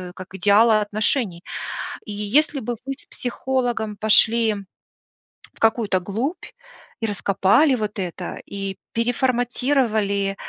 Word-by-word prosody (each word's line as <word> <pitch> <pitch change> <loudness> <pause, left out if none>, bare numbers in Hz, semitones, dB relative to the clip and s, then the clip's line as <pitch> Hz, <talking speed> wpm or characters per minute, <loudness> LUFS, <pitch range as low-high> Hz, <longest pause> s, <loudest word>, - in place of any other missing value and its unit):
как 185 0 -10
идеала 215 +3 +5
отношений. 210 -3 -1 0.6
И - - -7
если 265 +9 +1
бы 240 +2 -3
вы 275 - -2
с - - -15
психологом 245 -4 -2
пошли 220 +1 +4 1.0
в - - -23
какую-то 220 -4 +2
глубь, 230 - -3 0.6
и 225 - 0
раскопали 200 - +3
вот 210 -3 -3
это, 180 -1 -5
и 195 -1 -5 0.2
переформатировали, 240 -4 +1
220 Hz, 110 wpm, -22 LUFS, 200-245 Hz, 1.0 s, идеала